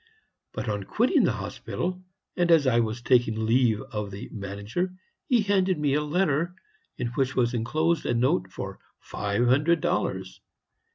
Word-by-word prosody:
But - - -4
on 105 -2 -2
quitting - - +3
the - - +2
hospital, 180 +1 -4 0.3
and 175 -1 +1
as 165 -4 +5
I 120 -2 +3
was 115 +1 -2
taking 115 -4 +2
leave 115 -2 +3
of 105 -1 -5
the 100 +1 -8
manager, 105 - -4 0.3
he 240 -4 +3
handed 190 -3 +2
me 145 -2 +1
a 150 - +2
letter, 165 +1 0 0.4
in 125 -1 -2
which 130 +1 -1
was 120 -1 +2
enclosed 155 +8 0
a - - +1
note 95 -6 +1
for - - -6 0.2
five 100 +3 -1
hundred 150 +7 +3
dollars. - - -2
130 Hz, 160 wpm, -26 LUFS, 110-170 Hz, 0.4 s, as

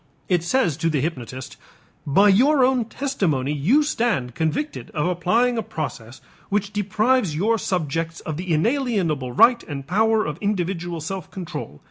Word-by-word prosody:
It 180 -3 +2
says 175 - +1
to 165 0 0
the 155 -3 0
hypnotist: 130 -4 -5 0.5
"By 195 +9 +5
your 260 +7 +5
own 255 -3 +1
testimony, 190 - -1
you 200 - +3
stand 230 - -1
convicted 160 - -2
of 150 +1 0
applying 220 +8 +1
a - - 0
process 130 - -6 0.3
which 205 0 -1
deprives 210 -1 +1
your 220 +7 +1
subjects 165 -2 -2
of 155 - -5
the 180 +2 -4
inalienable 175 - 0
right 235 - +5
and 140 -3 -6
power 220 +6 +2
of 150 +1 -4
individual 175 -4 -2
self 190 +4 -5
control. 160 - -7
180 Hz, 150 wpm, -22 LUFS, 155-225 Hz, 0.5 s, By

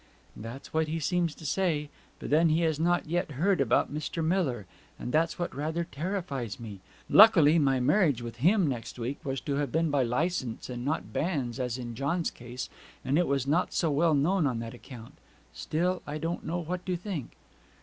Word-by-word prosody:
'That's 115 +5 -9
what 160 0 +1
he 160 +1 -2
seems 170 0 0
to 160 - -12
say. 155 -2 0 0.3
But - - -7
then 160 +2 +5
he 160 +2 +2
has 160 -3 +1
not 175 +2 +2
heard 175 +2 0
yet - - +3
about - - +2
Mr. 155 +2 -3
Miller; 155 - 0 0.3
and 125 - -5
that's 160 +3 +1
what 175 - -3
rather 160 +4 -2
terrifies 150 - -4
me. 105 -4 -8 0.3
Luckily 170 -7 +7
my 135 -3 +3
marriage 145 - +3
with 120 0 -7
him 180 - +4
next 125 -5 -4
week 125 +4 -4
was 135 -1 -2
to 140 -2 -2
have 145 -1 -1
been 160 0 +1
by 145 -2 +2
licence, 130 -1 -1
and 120 -1 -5
not 150 +4 -2
banns, 140 -7 -1
as 125 -1 -2
in 120 -2 -6
John's 145 +8 -1
case; 125 +1 -7 0.4
and 140 +5 +2
it 175 - +2
was 140 -2 0
not 160 +6 +1
so 165 -3 +1
well 155 +2 +3
known 160 +3 +2
on 125 -4 -1
that 115 +1 -5
account. 120 -2 -11 0.4
Still, 180 +3 -1
I 145 +1 -3
don't 165 +2 -3
know 170 +2 -2
what 175 +1 -4
to 180 - 0
think.' 175 - -5
150 Hz, 200 wpm, -29 LUFS, 130-170 Hz, 0.4 s, Luckily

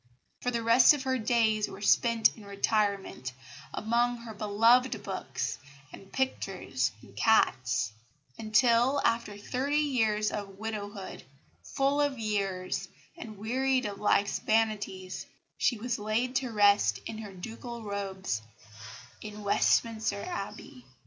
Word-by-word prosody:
For 250 - 0
the 235 -2 -2
rest 240 +6 +6
her 260 -1 -1
days 220 -2 +2
were - - -9
spent 230 +2 +3
in 220 - -13
retirement, 200 - -1 0.4
among 240 +2 +1
her 230 -1 -8
beloved 225 +5 +3
books - - -4 0.3
and 195 - -12
pictures 265 0 -1
and - - -16
cats; 125 - +2 0.4
until, 235 - +3
after 230 -3 0
thirty 260 +7 -2
years 225 -8 +1
of 200 -2 -6
widowhood, 205 -2 -6 0.4
full 275 +2 +1
of 285 -2 0
years 195 -4 -2 0.3
and 225 -11 -9
wearied 255 +4 0
of 200 -1 -4
life's 200 -1 +2
vanities, 210 -4 -1 0.3
she 240 - +2
was 235 +1 -3
laid 225 +5 -1
to 260 -2 -2
rest 200 - +4
in 220 - -6
her 210 -2 -7
ducal 230 +5 -8
robes 195 - -3 0.8
in 210 0 -8
Westminster 215 0 +1
Abbey. 200 - -7
220 Hz, 120 wpm, -29 LUFS, 200-240 Hz, 0.8 s, rest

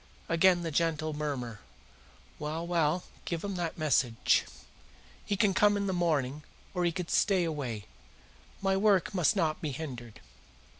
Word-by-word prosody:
Again 175 +1 +4
the 165 - -2
gentle 155 0 0
murmur. 135 -7 -4 0.8
"Well, 155 +3 -3
well, 170 0 +1 0.2
give 170 -2 -3
him 200 -1 -3
that 170 -2 -3
message. 130 -7 +2 0.8
He 200 - -2
can 205 -2 +3
come 205 +1 +4
in 200 - -1
the 190 - -1
morning, 150 -5 0 0.3
or 180 -2 0
he 170 - +2
can 180 0 -4
stay 190 -1 +3
away. 135 -10 -3 0.8
My 195 0 +2
work 200 -1 +3
must 180 0 +3
not 160 -5 0
be 155 - -2
hindered." 125 -6 -7
165 Hz, 150 wpm, -30 LUFS, 150-185 Hz, 0.8 s, Again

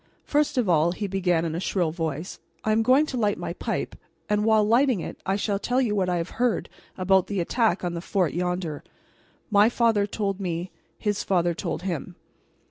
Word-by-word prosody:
"First 295 -1 +1
of 245 -5 +2
all," 170 0 +3
he 205 - -4
began 180 -4 +1
in 160 - -2
a 165 - -2
shrill 180 -3 0
voice, 160 0 -4 0.2
"I 215 - +1
am 220 +1 +3
going 260 +6 +4
to 265 - -4
light 210 -3 +1
my - - -4
pipe, - - -3 0.3
and 210 0 +1
while 220 -1 +4
lighting 235 +1 +3
it - - -7
I 190 - +2
shall 200 0 -1
tell 245 +4 0
you 240 -5 +1
what 185 -2 +1
I 180 - +1
have 170 +1 -3
heard 245 -6 +1 0.3
about 190 0 +3
the 200 -2 -2
attack 225 +6 +1
on 175 -1 -2
the 170 - -4
fort 185 -3 0
yonder. 180 -3 -2 0.7
My 205 +2 +6
father 225 -4 +2
told 200 -2 -2
me; 180 -1 -3 0.3
his 205 -1 -1
father 175 -2 +1
told 170 - -4
him." 175 -7 -4
195 Hz, 205 wpm, -25 LUFS, 175-220 Hz, 0.7 s, My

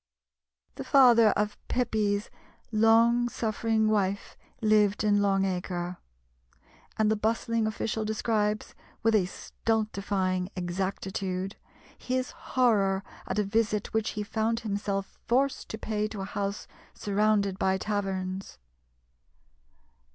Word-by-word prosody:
The - - -4
father 240 -5 +6
of 210 0 -1
Pepys's 215 -4 0 0.4
long 230 +2 +4
suffering 220 -1 0
wife 200 -2 0 0.2
lived 215 -2 +3
in 205 -1 +3
Long 195 -1 +2
Acre; 180 -1 -3 1.0
and 215 0 +3
the - - +3
bustling 225 +1 0
official 220 0 -2
describes, 215 -1 -1 0.3
with 225 0 +3
a 195 -4 +3
stultifying 195 -4 -1
exactitude, 190 +1 -3 0.4
his 255 0 -2
horror 200 -6 +1 0.2
at - - -2
a 210 - +3
visit 210 0 0
which 220 -1 +1
he 210 - -1
found 225 +2 -1
himself 200 -2 -3
forced 270 +3 +1
to 220 - -5
pay 215 -1 -2
to 210 -2 -6
a - - -3
house 200 +1 -3 0.3
surrounded 205 -1 +1
by 190 0 +2
taverns. 195 -2 -3
210 Hz, 115 wpm, -28 LUFS, 195-220 Hz, 1.0 s, father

